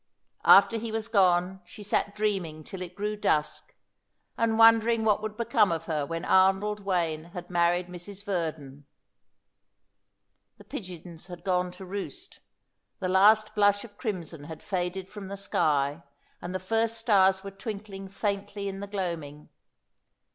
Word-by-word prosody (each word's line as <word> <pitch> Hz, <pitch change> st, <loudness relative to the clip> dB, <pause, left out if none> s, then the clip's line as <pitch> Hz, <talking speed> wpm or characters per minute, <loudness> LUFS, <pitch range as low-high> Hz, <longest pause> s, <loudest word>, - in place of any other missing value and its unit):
After 200 Hz, +3 st, +7 dB
he 225 Hz, 0 st, -4 dB
was 220 Hz, 0 st, -3 dB
gone 185 Hz, -3 st, +2 dB
she 205 Hz, +4 st, -12 dB
sat 205 Hz, 0 st, 0 dB
dreaming 190 Hz, -7 st, -2 dB
till 185 Hz, +4 st, -9 dB
it 180 Hz, 0 st, -7 dB
grew 210 Hz, +1 st, -2 dB
dusk, 155 Hz, -7 st, -1 dB, 0.6 s
and 225 Hz, -1 st, +1 dB
wondering 225 Hz, 0 st, +5 dB
what 210 Hz, -1 st, +3 dB
would 215 Hz, 0 st, -5 dB
become 230 Hz, -4 st, +3 dB
of 165 Hz, -1 st, -2 dB
her 150 Hz, -4 st, -2 dB
when 165 Hz, +2 st, -4 dB
Arnold 195 Hz, +2 st, +3 dB
Wayne 170 Hz, -5 st, -1 dB
had 175 Hz, 0 st, -9 dB
married 175 Hz, +1 st, +2 dB
Mrs. 185 Hz, +3 st, -9 dB
Verdon. 155 Hz, -7 st, -4 dB, 1.7 s
The -, -, -15 dB
pigeons 180 Hz, -, -8 dB
had 175 Hz, -2 st, -10 dB
gone 180 Hz, -1 st, +1 dB
to 190 Hz, -, -10 dB
roost, 205 Hz, -, -7 dB, 0.6 s
the 185 Hz, -, -3 dB
last 215 Hz, +3 st, +5 dB
blush 205 Hz, -1 st, +3 dB
of 215 Hz, -4 st, -13 dB
crimson 175 Hz, -, -5 dB
had 160 Hz, 0 st, -9 dB
faded 185 Hz, -1 st, -3 dB
from 205 Hz, -1 st, -9 dB
the 200 Hz, +1 st, -6 dB
sky, 145 Hz, -6 st, 0 dB, 0.4 s
and 180 Hz, +1 st, -5 dB
the -, -, -1 dB
first 225 Hz, +4 st, 0 dB
stars 195 Hz, -4 st, +3 dB
were 195 Hz, -, -7 dB
twinkling 195 Hz, -1 st, -7 dB
faintly 200 Hz, 0 st, -3 dB
in 195 Hz, 0 st, -5 dB
the 200 Hz, -, -6 dB
gloaming. 170 Hz, -7 st, -5 dB
195 Hz, 150 wpm, -28 LUFS, 175-210 Hz, 1.7 s, After